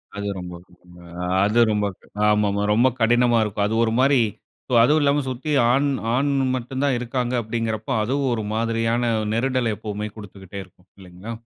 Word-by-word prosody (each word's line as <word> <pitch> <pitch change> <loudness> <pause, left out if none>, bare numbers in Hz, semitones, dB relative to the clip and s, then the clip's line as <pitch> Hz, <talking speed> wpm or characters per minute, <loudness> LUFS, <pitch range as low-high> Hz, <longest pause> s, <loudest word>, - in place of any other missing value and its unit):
அது 100 0 -4
ரொம்ப 90 -1 -7 0.7
ஆ - - -3 0.2
அது 105 +3 +2
ரொம்ப 105 -1 0 0.4
ஆமா 105 0 +3
ஆமா 100 +1 -1
ரொம்ப 120 +4 +4
கடினமா 120 +1 +3
இருக்கும். 100 -1 -1
அது 110 - -2
ஒரு 110 - -1
மாரி 135 0 +4 0.6
அதுவும் 150 +6 +3
இல்லாம 145 0 +2
சுத்தி 130 +4 -4 0.2
ஆண் 140 +3 +2 0.3
ஆண் 140 +2 +1 0.2
மட்டும் 130 +2 -4
தான் 140 -3 +2
இருக்காங்க 125 +1 -2
அப்டிங்கிறப்ப, 110 0 -3
அதுவும் 135 +2 0
ஒரு 110 -2 -2
மாதிரியான 115 +1 0 0.2
நெருடல் 125 -1 0
எப்போவுமே 105 0 -5
குடுத்துக்கிட்டே 100 -2 -10
இருக்கும் 90 0 -24
இல்லைங்களா? 95 +4 -10
115 Hz, 155 wpm, -22 LUFS, 105-130 Hz, 0.7 s, ரொம்ப